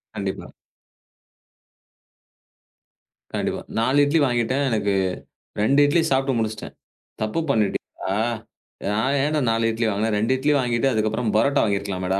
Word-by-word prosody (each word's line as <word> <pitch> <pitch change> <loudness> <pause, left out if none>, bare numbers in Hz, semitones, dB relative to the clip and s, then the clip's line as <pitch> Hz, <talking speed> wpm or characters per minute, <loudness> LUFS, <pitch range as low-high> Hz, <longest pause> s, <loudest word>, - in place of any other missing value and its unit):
கண்டிப்பா. 100 -2 -4 2.9
கண்டிப்பா. - - -2 0.2
4 130 +5 +2
இட்லி 155 +3 +2
வாங்கிட்டேன். 125 +3 0
எனக்கு 105 -3 0 0.7
2 135 +7 +3
இட்லி 165 +3 +3
சாப்பிட்டு 135 -1 +1
முடிச்சிட்டேன். 110 -1 -4 0.5
தப்பு 110 +8 -1
பண்ணிட்டேனா? 100 -4 -1 0.7
நான் 130 +7 +1
என்ன 155 +1 0
4 115 0 +1
இட்லி 115 +1 -1
வாங்குனேன். 105 +1 0
2 110 +5 +1
இட்லி 145 +3 +1
வாங்கிட்டு 120 +1 +1
அதுக்கப்புறம் 110 +1 0
பரோட்டா 140 +6 +3
வாங்கி 100 -2 +1
இருக்கலாமேடா 95 -1 -2
115 Hz, 120 wpm, -23 LUFS, 105-135 Hz, 2.9 s, 2